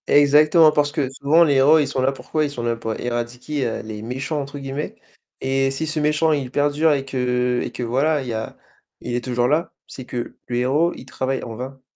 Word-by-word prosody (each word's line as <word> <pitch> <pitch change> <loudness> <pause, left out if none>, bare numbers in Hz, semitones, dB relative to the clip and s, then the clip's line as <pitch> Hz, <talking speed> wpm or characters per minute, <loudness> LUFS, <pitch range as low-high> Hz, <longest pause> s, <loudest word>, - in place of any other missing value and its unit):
Exactement 150 +2 +6
parce 145 -1 +1
que 145 -3 -1
souvent 145 +5 +4
les 145 -4 +3
héros 140 +4 +6
ils 150 -3 +2
sont 135 -1 -2
là 130 +1 +2
pourquoi? 155 +3 -2
Ils 150 - 0
sont 125 -4 -6
là 120 0 0
pour 115 -1 -5
éradiquer 120 +2 -3
«les 110 -1 -7
méchants» 130 +6 -3
entre 140 +1 -7
guillemets. 140 +2 -5 0.5
Et 135 0 +1
si 135 +4 -3
ce 155 0 -2
méchant 150 +2 +2
il 140 -4 -1
perdure 145 +3 +2
et 135 -1 -2
que 125 -2 0
et - - -5
que - - -5
voilà 140 +6 +1
il - - -8
y - - -2
a 110 0 -5 0.4
il - - -5
est 120 - -2
toujours 125 -1 0
là, 155 +6 0
c'est 130 - -9
que 120 -1 -5
le 120 - -3
héros 140 +8 +2
il - - -11
travaille 130 0 -3
en 115 - -7
vain. 130 +3 -7
135 Hz, 225 wpm, -21 LUFS, 125-150 Hz, 0.5 s, Exactement